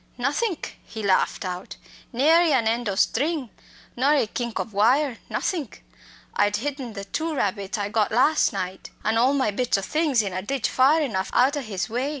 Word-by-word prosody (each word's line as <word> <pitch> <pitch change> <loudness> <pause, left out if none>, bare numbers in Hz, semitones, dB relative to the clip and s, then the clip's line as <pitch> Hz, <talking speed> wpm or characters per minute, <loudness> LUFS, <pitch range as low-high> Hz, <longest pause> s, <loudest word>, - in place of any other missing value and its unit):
"Nothink!" 290 - -2
he 220 - -8
laughed 195 0 +1
out. 180 0 -5 0.4
"Nary 320 +6 +4
an 235 -4 +2
end 230 0 0
o' 195 - -2
string, 270 - 0 0.4
nor 275 +5 +3
a 280 - +2
kink 235 +1 -4
o' - - +1
wire 235 +5 +1
nothink. 320 - -3 0.5
I'd 205 0 +2
hidden 260 0 -4
the 200 -1 -7
two 315 +10 -3
rabbits 200 -3 -2
I 205 -1 -2
got 210 -1 +1
las' 255 +8 +3
night, 185 -2 -5 0.2
and 220 +1 +2
all 260 +4 +3
my 260 -6 +1
bits 245 +1 0
o' - - -2
things 290 0 +1
in 195 -2 -4
a 185 - -2
ditch 260 +4 -1
far 275 +5 +4
enough 205 -10 -2
out 265 +4 +4
o' 290 - -2
his 195 -7 -4
way. 250 +5 -2
240 Hz, 190 wpm, -24 LUFS, 205-280 Hz, 0.5 s, Nary